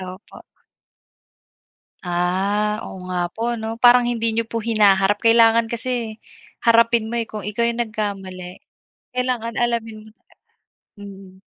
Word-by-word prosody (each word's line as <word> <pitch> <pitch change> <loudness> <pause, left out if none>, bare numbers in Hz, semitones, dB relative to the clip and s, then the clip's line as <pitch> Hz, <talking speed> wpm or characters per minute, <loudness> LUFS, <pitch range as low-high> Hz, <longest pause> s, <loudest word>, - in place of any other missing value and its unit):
Opo. 185 +2 -10 1.6
Ah, 195 +4 0
oo 185 - -9
nga 175 -1 -1
po, 235 +1 -2
'no? 220 0 -4
Parang 245 0 +6
hindi 230 -1 0
niyo 225 0 -1
po 230 -1 -4
hinaharap 205 -3 +3
kailangan 230 0 +4
kasi 230 -1 -4 0.4
harapin 230 -1 +3
mo, 235 - -2
eh, 230 - -2
kung 215 -2 -7
ikaw 210 +4 -1
yung 235 0 0
nagkamali 195 -5 -6 0.5
kailangan 245 -2 -2
alamin 225 -2 -2
mo - - -15 0.9
mm. 195 -2 -12
220 Hz, 125 wpm, -21 LUFS, 200-230 Hz, 1.6 s, Parang